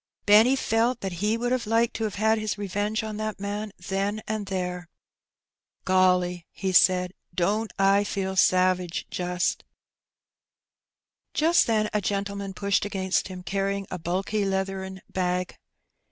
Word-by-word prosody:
Benny 220 +6 +6
felt 235 0 +1
that 195 - -3
he 215 +2 +1
would 245 +1 -1
have 255 -3 0
liked 230 +1 +2
to 225 - -1
have 210 - -4
had 220 +2 +2
his 215 -1 -2
revenge 205 +2 -2
on 215 -1 -5
that 215 -2 -4
man 205 +1 -4 0.2
then 195 +2 -1
and 215 -2 -3
there. 180 -2 -3 0.5
'' - - -56
Golly/' 180 -2 +2
he 190 -1 -3
said, 180 0 +4
" - - -31
don't 215 +3 -1
I 195 +1 +4
feel 190 -2 -3
savage, 185 -2 +2
jnst 180 -1 -1 0.9
!" - - -59
Jast 335 +3 +4
then 215 -2 +2
a 210 - +1
gentleman 200 -1 -3
pushed 200 0 +1
against 190 -2 -1
him^ 185 -1 -9
carrying 195 0 -1
a 180 - -4
bulky 190 +5 -1
leathern 190 -1 -3
bag. 180 -1 -2
195 Hz, 155 wpm, -26 LUFS, 185-215 Hz, 0.9 s, Benny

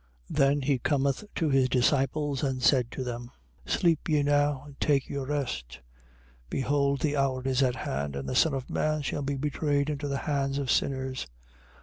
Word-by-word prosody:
26:45. - - -5
Then 140 +1 +4
he 135 -1 +1
cometh 140 +4 0
to 160 -3 +1
his 135 -1 +3
disciples 135 +2 +1
and 130 -3 -1
said 125 -2 +4
to 130 - -5
them: 120 -1 -5 0.4
Sleep 165 -2 +1
ye 150 -2 +3
now 145 -1 +2
and 140 -2 -14
take 140 -3 +2
your 140 -2 -4
rest. 65 - -3 0.7
Behold 140 - +1
the 150 -2 +1
hour 135 -2 0
is 130 0 +2
at 130 -2 +2
hand: 70 - -3
and 70 -1 -4
the - - -2
Son 160 -4 +3
of 130 -1 -4
man 155 -1 0
shall 145 - -2
be 140 0 -2
betrayed 145 +1 0
into 145 0 -3
the 140 -1 -1
hands 140 -2 0
of 140 -2 -1
sinners. 130 -1 -1
140 Hz, 190 wpm, -28 LUFS, 130-145 Hz, 0.7 s, Then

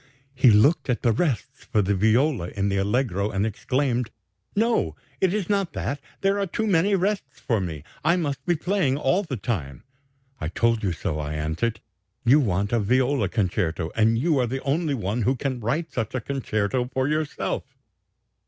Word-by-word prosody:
He 130 -1 +5
looked 135 +8 +4
at 125 - 0
the 120 - +4
rests 135 - -1
for 110 -5 +1
the 100 +2 +1
viola 110 - +2
in 100 +2 -1
the 100 - 0
allegro 100 -1 0
and 100 +1 0
exclaimed: 125 +2 -1 0.5
'No, 215 - +1 0.2
it 190 -2 +3
is 205 -2 -1
not 200 -3 0
that: 140 - -3 0.2
there 195 +1 +2
are 200 - 0
too 220 +5 -2
many 195 0 +3
rests 190 -7 -1
for 115 -5 0
me; 80 -5 -5 0.2
I 170 - +4
must 140 -6 -2
be 175 - +3
playing 170 -5 +1
all 180 +6 +2
the 150 -10 -4
time.' 85 - -4 0.6
'I 80 - -3
told 115 +6 +1
you 95 - +1
so,' 85 -2 -3
I 75 0 -3
answered; 80 +10 -2 0.4
'you 135 +6 +6
want 100 -5 0
a 120 - +3
viola 125 0 +2
concerto, 90 -6 -1
and 110 +1 +3
you 150 +3 +2
are 125 - +2
the 130 +3 -4
only 150 +1 0
one 110 +1 -2
who 125 +5 +2
can 130 -1 -2
write 150 +9 -2
such 115 +1 -3
a - - +1
concerto 125 -2 -1
for 130 +1 0
yourself.' 150 -3 -2
125 Hz, 185 wpm, -25 LUFS, 100-150 Hz, 0.6 s, you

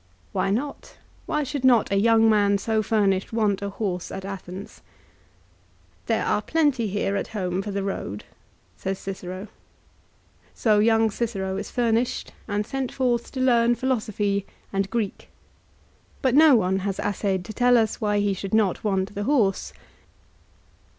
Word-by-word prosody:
Why - - 0
not? 265 +8 -3 0.3
Why 300 0 0
should 280 -1 -4
not 245 -6 +4
a - - +2
young 225 +1 +5
man 205 -2 +4
so 220 +2 0
furnished 200 -3 +1
want 210 -3 +1
a 200 - -2
horse 195 -4 -3
at 190 - -6
Athens. 195 0 -8 0.6
" - - -35
There - - +1
are - - +1
plenty 290 -8 +1
here 200 0 -1
at - - -2
home 180 -1 -1
for 205 - -6
the 200 -1 -2
road," 150 - -4 0.5
says 190 0 -3
Cicero. 190 +1 -6 1.1
So 215 -3 +3
young 225 0 +3
Cicero 195 -4 -2
is 200 +1 -4
furnished, 240 0 0
and 210 -1 -1
sent 270 0 -3
forth 245 -3 0
to 265 - -4
learn 240 -2 +4
philosophy 215 -6 -1 0.3
and 195 0 0
Greek. 220 -3 -3 0.9
But 260 -2 +3
no 300 -1 +7
one 190 -3 +2
has 195 0 -3
assayed 195 -2 -1
to 215 - -7
tell 245 +2 +4
us 220 -2 0
why 210 -1 +1
he 205 -1 +1
should 195 +2 -3
not 210 -4 +1
want 195 -1 0
the 205 0 -3
horse. 225 -9 +1
210 Hz, 155 wpm, -24 LUFS, 195-235 Hz, 1.1 s, no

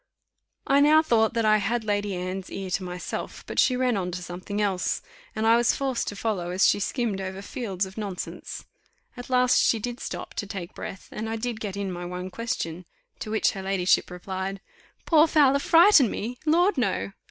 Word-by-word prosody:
I 275 +1 +4
now 305 +2 +6
thought 225 -5 +2
that 230 -1 +1
I 215 0 +5
had 220 +3 -1
Lady 205 -2 -1
Anne's 185 +1 -4
ear 190 -1 -6
to 195 - 0
myself; 180 0 -6
but - - -3
she 255 - +4
ran 250 -2 +1
on 185 -2 -2
to 180 0 -5
something 180 +4 -5
else, 195 -4 0 0.3
and 220 0 -1
I 225 +1 +6
was 240 0 +3
forced 265 -3 -1
to 205 - -4
follow 200 -5 -2
as 180 +2 +3
she - - +3
skimmed 210 -2 -1
over 190 0 -5
fields 200 -5 -3
of 190 +3 -9
nonsense. 200 -4 -6 0.5
At 245 0 -9
last 250 -1 +4
she 230 - +3
did 245 +3 -5
stop - - -6
to 205 - -3
take 185 -3 -6
breath, 190 - -8
and 220 +1 -4
I 225 - -2
did 230 0 -3
get 200 -3 -5
in 200 -2 -3
my 175 0 -6
one 180 +1 -5
question: 180 -7 -4 0.3
to - - -6
which 220 0 +2
her 195 - -6
ladyship 190 -1 +2
replied, 190 +2 -5 0.5
"Poor 320 -1 +5
Fowler 280 -3 +4
frighten 330 - +6
me? 240 +6 -5
Lord! 345 +1 +3
No. 195 -3 -1
210 Hz, 200 wpm, -26 LUFS, 190-245 Hz, 0.5 s, now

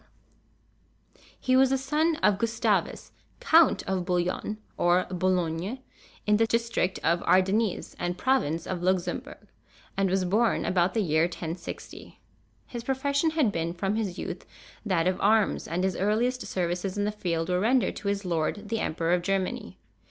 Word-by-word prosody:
[TN]] - - -28 0.2
He 255 - +2
was 265 0 +5
the 270 - +2
son 305 +5 +1
of 205 -2 +4
Gustavus, 230 +1 0 0.3
Count 335 -9 +4
of 190 -2 -1
Bouillon, 180 +4 -1 0.2
or 175 +1 +3
Boulogne, 180 +3 -1 0.5
in 210 0 +4
the 225 +1 +3
district 230 -5 0
of 170 +1 +2
Ardennes 195 +3 +1
and 175 0 -2
province 175 - +1
of 180 -2 -4
Luxembourg, 180 -1 -2 0.5
and 195 -1 +1
was 190 0 +1
born 220 +6 +1
about 180 0 +1
the 225 - +2
year 155 -1 +2
1060. 170 0 -7 0.5
His 240 -2 -7
profession 280 +4 +1
had 260 -9 +3
been 165 -2 -2
from 195 +3 -1
his 200 -5 -2
youth - - -5 0.4
that 185 -6 +1
of 185 0 0
arms, 215 +1 +2
and 175 +2 -2
his 190 -2 0
earliest 235 +6 0
services 180 +2 -2
in 205 - 0
the 210 - 0
field 170 -5 -2
were 180 0 +1
rendered 245 +5 +2
to 205 - -6
his 200 0 -1
lord, 180 +5 -2
the 225 0 -1
Emperor 165 -1 0
of 180 - +2
Germany. 195 0 -2
190 Hz, 160 wpm, -27 LUFS, 175-225 Hz, 0.5 s, was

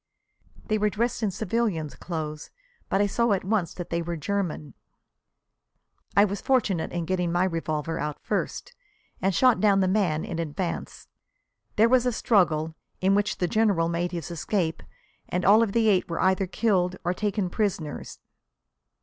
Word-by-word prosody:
They 215 -1 0
were 210 0 +2
dressed 230 +4 -1
in 215 - +1
civilians' 195 -6 -1
clothes, 155 -3 -5 0.4
but 195 - +2
I - - +4
saw 235 +2 +1
at 190 - -1
once 195 -3 0
that 175 - -7
they 170 0 0
were 170 0 -4
German. 155 -5 -3 1.4
"I 200 - +8
was 200 0 -4
fortunate 210 -11 +1
in 175 -1 -2
getting 180 -1 0
my 175 +1 +2
revolver 165 -2 -2
out 150 -1 -3
first, - - -3 0.5
and 190 -1 +1
shot 255 +4 +4
down 200 -2 +4
the 190 - +2
man 185 -6 +1
in 170 -3 -4
advance. 170 +3 -4 0.7
There 220 +2 +5
was 250 0 +3
a - - +2
struggle, 165 -9 +2 0.3
in 190 +1 +3
which 205 -1 +1
the 180 - 0
General 195 -5 +2
made 175 +1 -1
his 170 -1 -5
escape 170 0 -1 0.5
and 180 0 -1
all 210 +3 +7
of 225 -3 +1
the 225 +1 +2
eight 190 -4 +2
were 170 - -3
either 190 0 +2
killed 185 -3 +1
or 175 - 0
taken 205 -2 -1
prisoners. 175 -9 -3
185 Hz, 165 wpm, -26 LUFS, 170-210 Hz, 1.4 s, I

